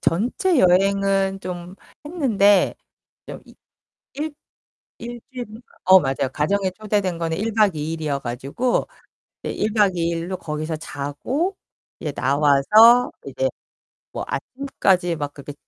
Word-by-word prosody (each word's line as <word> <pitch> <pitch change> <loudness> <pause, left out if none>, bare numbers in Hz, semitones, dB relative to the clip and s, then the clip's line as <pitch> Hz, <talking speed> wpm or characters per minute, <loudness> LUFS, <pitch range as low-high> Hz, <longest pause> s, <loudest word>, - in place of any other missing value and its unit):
전체 250 - +1
여행은 195 0 +2
좀 180 -1 -7 0.3
했는데 215 - +3 0.5
좀 - - -8
이 - - -17 0.6
일 300 +1 -4 0.6
일주일인가 240 -1 -8 0.2
어 185 +1 +8
맞아요. 135 -3 -1
가정에 190 +6 0
초대된 200 -3 -1
거는 165 -1 -2
1 220 +2 -2
박 210 -5 +3
2 155 +2 -3
일이어 155 -4 -2
가지고 135 - -2 0.6
이제 - - -3
1 215 +1 -1
박 205 -4 +3
2 170 -1 0
일로 170 +2 -3
거기서 155 +1 -4
자고 165 - -3 0.4
이제 150 - -3
나와서 150 - +5 0.2
이제 - - -1 0.6
뭐 - - -4
아침까지 190 -10 -1
막 145 -1 -4
그렇게 145 0 -9
190 Hz, 235 characters per minute, -22 LUFS, 155-225 Hz, 0.6 s, 어